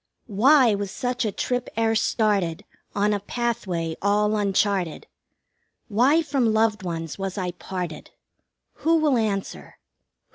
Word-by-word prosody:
2 215 Hz, -, -12 dB
Why 255 Hz, +2 st, +5 dB
was 200 Hz, -1 st, -3 dB
such 245 Hz, +3 st, -2 dB
a 215 Hz, -, 0 dB
trip 245 Hz, +5 st, -2 dB
e'er 225 Hz, 0 st, +2 dB
started 205 Hz, -5 st, 0 dB, 0.3 s
On 205 Hz, +1 st, +2 dB
a 205 Hz, -, -1 dB
pathway 190 Hz, -7 st, -3 dB
all 210 Hz, +1 st, +2 dB
uncharted? 195 Hz, -4 st, 0 dB, 0.8 s
Why 260 Hz, +10 st, +3 dB
from 270 Hz, -6 st, +1 dB
loved 220 Hz, -1 st, +2 dB
ones 165 Hz, -1 st, -5 dB
was 195 Hz, 0 st, -4 dB
I 180 Hz, -2 st, -2 dB
parted? 175 Hz, -3 st, -6 dB, 0.7 s
Who 330 Hz, +1 st, +2 dB
will 310 Hz, -4 st, +3 dB
answer? 210 Hz, -4 st, -3 dB
210 Hz, 135 wpm, -24 LUFS, 190-240 Hz, 0.8 s, Why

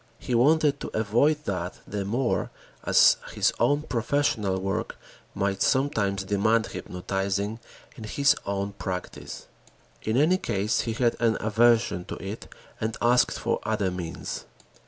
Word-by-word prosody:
He 125 Hz, -, -4 dB
wanted 145 Hz, +4 st, +4 dB
to -, -, -5 dB
avoid 120 Hz, +8 st, +2 dB
that 90 Hz, -2 st, -3 dB
the 100 Hz, -1 st, -3 dB
more 120 Hz, +5 st, 0 dB, 0.3 s
as -, -, +6 dB, 0.2 s
his -, -, +2 dB
own 145 Hz, +1 st, +2 dB
professional 115 Hz, -7 st, 0 dB
work 95 Hz, +1 st, -3 dB, 0.4 s
might 100 Hz, -1 st, -1 dB
sometimes 105 Hz, -8 st, +1 dB
demand 110 Hz, +3 st, +2 dB
hypnotizing 100 Hz, +4 st, -3 dB, 0.4 s
in 110 Hz, -, -8 dB
his 140 Hz, +6 st, +3 dB
own 100 Hz, 0 st, -2 dB
practice. 95 Hz, -2 st, -6 dB, 0.6 s
In 110 Hz, +2 st, -1 dB
any 170 Hz, +7 st, +4 dB
case 105 Hz, -, 0 dB
he 115 Hz, -, -3 dB
had 120 Hz, 0 st, +1 dB
an 115 Hz, -2 st, +2 dB
aversion 110 Hz, -4 st, +2 dB
to -, -, -6 dB
it 100 Hz, +3 st, -7 dB, 0.3 s
and 110 Hz, +1 st, -2 dB
asked 120 Hz, +1 st, +3 dB
for -, -, -1 dB
other 105 Hz, -3 st, 0 dB
means. 85 Hz, -2 st, -5 dB
110 Hz, 135 wpm, -26 LUFS, 100-120 Hz, 0.6 s, as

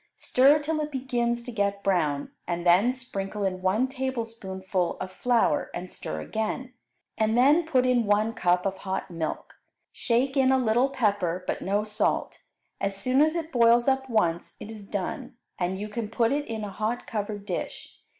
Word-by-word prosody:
Stir 275 Hz, +4 st, +5 dB
till 305 Hz, +1 st, -2 dB
it 300 Hz, 0 st, -3 dB
begins 240 Hz, -3 st, -1 dB
to 245 Hz, -, -7 dB
get 200 Hz, -2 st, -1 dB
brown, 155 Hz, -7 st, 0 dB, 0.2 s
and 175 Hz, 0 st, -2 dB
then 185 Hz, +8 st, +5 dB
sprinkle 210 Hz, -6 st, -5 dB
in 185 Hz, -1 st, -1 dB
one 200 Hz, +7 st, +2 dB
tablespoonful 225 Hz, -9 st, -3 dB
of 185 Hz, 0 st, -5 dB
flour 240 Hz, +5 st, +1 dB
and 180 Hz, +1 st, -6 dB
stir 80 Hz, 0 st, -5 dB
again, 220 Hz, -, -3 dB, 0.5 s
and 220 Hz, +1 st, +2 dB
then 295 Hz, +6 st, +5 dB
put 260 Hz, -5 st, +3 dB
in 245 Hz, -3 st, +2 dB
one 210 Hz, +2 st, +2 dB
cup 180 Hz, -1 st, +1 dB
of 195 Hz, -1 st, -1 dB
hot 190 Hz, -1 st, -4 dB
milk. 165 Hz, -2 st, -5 dB, 0.3 s
Shake 255 Hz, +3 st, 0 dB
in 265 Hz, -1 st, +4 dB
a 265 Hz, -, +4 dB
little 245 Hz, +2 st, +2 dB
pepper, 200 Hz, -9 st, 0 dB
but -, -, -2 dB
no 205 Hz, +2 st, 0 dB
salt. 210 Hz, 0 st, -1 dB, 0.4 s
As 195 Hz, 0 st, -2 dB
soon 255 Hz, +7 st, +2 dB
as 310 Hz, +2 st, +3 dB
it 330 Hz, -1 st, -3 dB
boils 235 Hz, 0 st, +4 dB
up 265 Hz, 0 st, +1 dB
once, 175 Hz, -7 st, 0 dB
it 220 Hz, -, -8 dB
is 210 Hz, -3 st, -10 dB
done, 210 Hz, +7 st, -4 dB, 0.2 s
and 185 Hz, +1 st, -1 dB
you 210 Hz, -, -4 dB
can 215 Hz, 0 st, -4 dB
put 230 Hz, 0 st, +1 dB
it 290 Hz, +1 st, -1 dB
in 220 Hz, -1 st, -4 dB
a 205 Hz, -, -5 dB
hot 220 Hz, +5 st, -2 dB
covered 205 Hz, -1 st, -4 dB
dish. 185 Hz, -4 st, -5 dB
220 Hz, 180 wpm, -27 LUFS, 195-255 Hz, 0.5 s, Stir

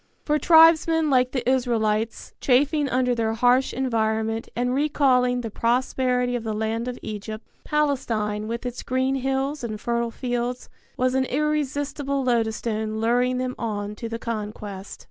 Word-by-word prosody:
For 300 Hz, 0 st, +2 dB
tribesmen 325 Hz, -1 st, +5 dB
like 255 Hz, -1 st, +3 dB
the 255 Hz, -3 st, -3 dB
Israelites, 225 Hz, -4 st, 0 dB
chafing 285 Hz, +3 st, +2 dB
under 255 Hz, 0 st, +1 dB
their 225 Hz, -2 st, 0 dB
harsh 245 Hz, +3 st, +3 dB
environment 225 Hz, -3 st, -1 dB
and 245 Hz, +1 st, 0 dB
recalling 255 Hz, -3 st, +2 dB
the 225 Hz, -2 st, -5 dB
prosperity 250 Hz, +1 st, 0 dB
of 240 Hz, -, -3 dB
the 220 Hz, -1 st, -3 dB
land 220 Hz, +2 st, -2 dB
of 250 Hz, -1 st, -4 dB
Egypt, 215 Hz, +1 st, -6 dB, 0.2 s
Palestine 230 Hz, -8 st, -1 dB
with 235 Hz, +2 st, -4 dB
its 245 Hz, 0 st, -4 dB
green 260 Hz, +1 st, 0 dB
hills 270 Hz, +2 st, -1 dB
and 215 Hz, -3 st, -4 dB
fertile 235 Hz, +1 st, -1 dB
fields 245 Hz, +1 st, -3 dB, 0.3 s
was 255 Hz, 0 st, +1 dB
an 265 Hz, 0 st, +2 dB
irresistible 285 Hz, -1 st, -1 dB
lodestone 220 Hz, -2 st, -1 dB
luring 245 Hz, +3 st, +2 dB
them 255 Hz, 0 st, -2 dB
on 205 Hz, -2 st, -3 dB
to 230 Hz, -, -5 dB
the 230 Hz, -, -3 dB
conquest. 210 Hz, -4 st, -6 dB
245 Hz, 145 wpm, -24 LUFS, 225-265 Hz, 0.3 s, tribesmen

